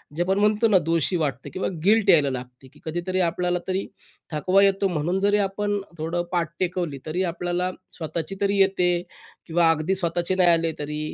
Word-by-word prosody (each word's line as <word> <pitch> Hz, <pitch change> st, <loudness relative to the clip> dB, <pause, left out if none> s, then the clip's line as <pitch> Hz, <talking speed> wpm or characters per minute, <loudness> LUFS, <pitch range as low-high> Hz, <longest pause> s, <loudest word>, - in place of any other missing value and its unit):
जे 175 Hz, -, +1 dB
आपण 190 Hz, +2 st, 0 dB
म्हणतो 210 Hz, +2 st, +3 dB
ना 210 Hz, -3 st, +5 dB
दोषी 165 Hz, +2 st, +1 dB
वाटते 140 Hz, -5 st, -3 dB
किंवा 185 Hz, -, -3 dB, 0.2 s
गिल्ट 215 Hz, +2 st, +4 dB
यायला 145 Hz, -4 st, +6 dB
लागते 125 Hz, +1 st, -8 dB
की -, -, -19 dB
कधीतरी 175 Hz, +3 st, -2 dB
आपल्याला 180 Hz, +1 st, -1 dB
तरी 190 Hz, +1 st, -1 dB, 0.5 s
थकवा 185 Hz, +6 st, +3 dB
येतो 195 Hz, 0 st, +3 dB
म्हणून 175 Hz, +1 st, -1 dB
जरी 205 Hz, +1 st, +3 dB
आपण 205 Hz, +1 st, -1 dB, 0.2 s
थोडं 165 Hz, +2 st, -2 dB
पाठ 170 Hz, -3 st, 0 dB
टेकवली 175 Hz, -5 st, -2 dB
तरी 175 Hz, +4 st, -1 dB
आपल्याला 175 Hz, +2 st, -2 dB, 0.3 s
स्वतःची 165 Hz, +2 st, -4 dB
तरी 200 Hz, 0 st, +1 dB
येते 190 Hz, -2 st, +3 dB, 0.6 s
किंवा 165 Hz, 0 st, +3 dB
अगदी 165 Hz, +4 st, 0 dB
स्वतःचे 175 Hz, 0 st, -1 dB
नाही 180 Hz, -2 st, +4 dB
आले 165 Hz, -1 st, +3 dB
तरी 150 Hz, +1 st, -4 dB
175 Hz, 180 wpm, -24 LUFS, 165-190 Hz, 0.6 s, यायला